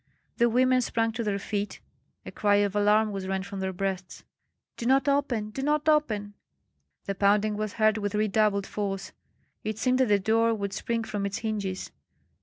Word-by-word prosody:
The 235 -1 +4
women 255 +2 +3
sprang 225 -1 0
to 230 +1 -3
their 205 -2 0
feet; 205 +1 -3 0.5
a - - -7
cry 205 -1 +2
of 205 0 +1
alarm 210 +1 +3
was 195 -2 -4
rent 190 0 -2
from 200 -1 -6
their 190 0 -2
breasts. 185 -1 -4 0.5
"Do 235 - -4
not 270 +1 +3
open! 255 -7 0
do 270 - -5
not 300 +2 0
open!" 220 -10 +1 0.7
The 195 - -2
pounding 205 +2 +2
was 215 -1 -3
heard 215 -1 +2
with 205 0 -2
redoubled 210 -1 +2
force; 195 -2 -4 0.5
it 215 0 -3
seemed 255 +2 +1
that 260 - +4
the 205 -1 +4
door 225 +3 +2
would 200 -2 -4
spring 230 +3 -2
from 205 -2 -4
its 200 0 -2
hinges. 205 -4 -3
210 Hz, 185 wpm, -27 LUFS, 200-230 Hz, 0.7 s, The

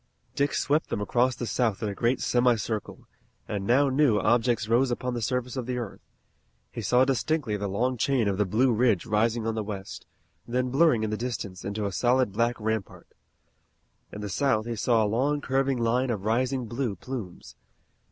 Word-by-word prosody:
Dick 140 +1 0
swept 150 +3 +1
them - - -2
across 120 +4 +1
the 120 - -4
South 115 -3 0
in - - 0
a 100 - -3
great 120 +5 0
semi 125 0 +3
circle, 110 0 -5 0.4
and 100 -1 -3
now 140 +4 +4
new 135 -4 +3
objects 115 +2 +2
rose 120 +4 +3
upon 125 +1 -2
the 120 - -3
surface 125 +2 -2
of 125 -2 -4
the 125 -1 -2
earth. 115 -5 -6 0.7
He - - -5
saw 125 +1 +3
distinctly 135 -2 0
the 100 0 -3
long 120 +6 -1
chain 125 -2 +1
of 100 0 -1
the 105 - +3
Blue 120 +6 +2
Ridge 115 -5 +2
rising 110 +1 +1
on 115 - 0
the 110 - -2
west, 100 -2 -7 0.4
then 125 +1 -1
blurring 135 -5 +3
in 110 - -1
the 110 - -1
distance 105 -6 -5
into 100 +1 -3
a 100 - -2
solid 125 +2 +2
black 115 +4 0
rampart. 110 -2 -4 1.0
In 105 - -7
the 105 - -4
south 110 +1 +1
he 120 0 -3
saw 115 +1 +2
a - - +2
long 130 +8 +1
curving 135 -1 0
line 120 +2 +1
of 105 -4 -3
rising 125 +3 0
blue 115 -1 -3
plumes. 105 -3 -8
120 Hz, 195 wpm, -27 LUFS, 105-130 Hz, 1.0 s, now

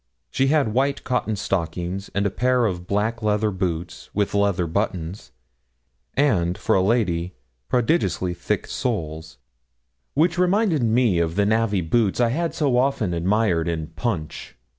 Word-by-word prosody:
She 135 - +1
had 140 -7 +2
white 135 +3 0
cotton 125 -4 -1
stockings, 90 +1 -3
and 100 +1 +1
a 100 - +1
pair 125 +2 +2
of 90 -4 -3
black 110 +3 -1
leather 105 0 +1
boots, 90 -3 -4
with 100 -1 0
leather 100 -3 +2
buttons, 90 - -3 0.8
and, 95 -11 +2
for 110 - 0
a 95 - +4
lady, 95 -5 0 0.3
prodigiously 120 - +1
thick 85 +4 -2
soles, 80 - -4 0.8
which 170 +4 +2
reminded 180 - +2
me 115 -5 +3
of 85 0 0
the 100 0 +2
navvy 110 -2 +1
boots 100 +6 +1
I 120 -1 +3
had 165 +7 -1
so 140 -5 +1
often 125 -8 +1
admired 90 -1 +1
in 80 -2 -3
Punch. 90 - -4
105 Hz, 145 wpm, -23 LUFS, 90-125 Hz, 0.8 s, a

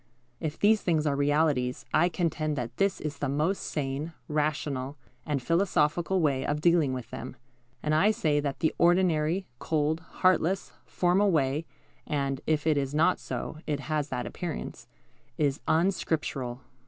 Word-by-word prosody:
If 155 -1 -3
these 215 0 +4
things 160 -4 +1
are 145 -2 +1
realities, 145 -3 +1
I 175 +3 +4
contend 160 -3 -1
that 120 -3 -5
this 195 0 +1
is 150 -1 -5
the 145 - -1
most 155 +8 +1
sane, 145 +2 -3
rational, 145 -2 -1 0.3
and 140 -4 -1
philosophical 170 +1 +2
way 140 -4 +1
of 145 +2 -1
dealing 165 -3 +3
with 125 -2 -5
them; 130 +2 -6 0.5
and 150 - +1
I 160 +7 +5
say 155 -8 +1
that 140 -2 -3
the 160 - +2
ordinary, 175 0 +3
cold, 155 0 0
heartless, 185 +2 +1 0.2
formal 185 +3 +2
way 150 -1 +1 0.4
(and, 140 -3 -1
if 155 -1 +1
it 155 -2 +3
is 135 +1 -3
not 165 +4 +3
so, 155 - -5
it 145 -2 -1
has 150 0 -2
that 125 - -3
appearance) 60 +1 -6 0.5
is 145 -1 +1
unscriptural. 155 -7 0
155 Hz, 155 wpm, -28 LUFS, 140-170 Hz, 0.5 s, I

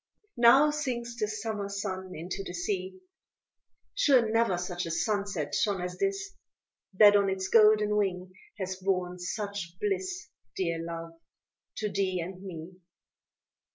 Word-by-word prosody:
Now 265 +6 +7
sinks 245 -5 -3
the 210 - +1
Summer 215 -1 -4
sun 190 -2 -4
into 180 +5 -5
the 180 - -7
sea; 185 - -3 0.9
Sure 275 - +4
never 225 -5 +2
such 175 0 -3
a - - -4
sunset 200 -3 -1
shone 200 -3 +1
as 180 0 -5
this, 395 0 -1 0.6
That 205 +1 +8
on 200 -1 +4
its 190 0 -2
golden 210 -1 +5
wing 185 -3 -1 0.2
has 190 -2 -4
borne 185 -1 -1
such 195 -2 -4
bliss; 375 -3 -2 0.3
Dear 170 -3 -1
Love 165 0 -7 0.6
to 215 - -2
thee 190 -2 0
and 180 +2 -6
me. 180 -1 -8
195 Hz, 135 wpm, -29 LUFS, 180-220 Hz, 0.9 s, That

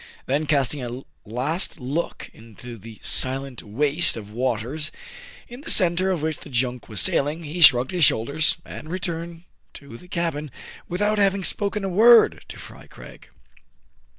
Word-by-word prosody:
Then 145 +3 -1
casting 140 -1 0
a 125 +2 -7 0.3
last 145 - 0
look 140 +7 -5
into 115 +2 -12
the 110 +2 -13
silent 130 -1 +1
waste 145 +10 +1
of 105 -2 -10
waters, 125 +6 -3 0.6
in 245 +3 -11
the 315 - -4
centre 185 0 +4
of 175 -5 -2
which 155 -1 -3
the - - -13
junk 125 -1 -3
was 105 -3 -2
sail 140 - +3
ing, 160 +3 -6
he 160 +3 -6
shrugged 130 -4 +6
his 175 -4 +3
shoulders, 140 +4 +1
and 155 - -10
returned 170 -1 -5 0.3
to 140 -5 -11
the 180 - -17
cabin, 165 -4 -4 0.4
without 205 +4 -1
having 195 -1 +1
spoken 205 +2 -2
a 195 - -2
word 225 +5 +5
to - - -10
Fry - - -13
Craig. - - -15
150 Hz, 160 wpm, -22 LUFS, 125-175 Hz, 0.6 s, shrugged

